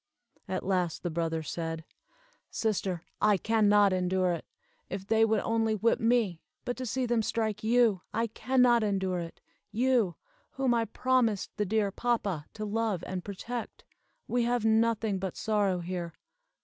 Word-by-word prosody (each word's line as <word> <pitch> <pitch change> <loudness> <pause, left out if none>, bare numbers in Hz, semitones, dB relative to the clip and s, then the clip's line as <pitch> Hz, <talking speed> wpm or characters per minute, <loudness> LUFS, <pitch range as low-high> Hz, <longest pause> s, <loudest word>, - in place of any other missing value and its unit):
At 185 - -3
last 180 -3 0
the 175 - -2
brother 165 0 -1
said: 165 0 -4 0.6
"Sister, 190 -5 -1 0.2
I 210 -1 +4
can 215 +2 +2
not 205 -2 +5
endure 185 0 +1
it. 170 - -5 0.4
If 195 0 -5
they 220 +2 +3
would 220 -1 +3
only 225 -1 +1
whip 225 +3 +2
me 225 -7 +1 0.2
but 245 - -2
to 255 -1 -4
see 260 +3 -1
them 240 -1 +1
strike 220 -1 -2
you! 225 -4 +3
I 230 - 0
can 250 +3 +1
not 240 -2 +5
endure 190 -3 0
it! 165 -1 -8 0.3
You, 230 -4 +2 0.4
whom 265 -2 +1
I 230 -1 +2
promised 235 -3 0
the 210 - 0
dear 210 0 +1
papa 200 -9 -1
to 215 - -4
love 215 -4 -1
and 185 -1 -4
protect. 225 +5 -6 0.4
We 245 - +1
have 240 -2 0
nothing 220 -2 +2
but 190 -1 -4
sorrow 205 -5 +1
here. 175 -1 -4
210 Hz, 160 wpm, -29 LUFS, 185-230 Hz, 0.6 s, not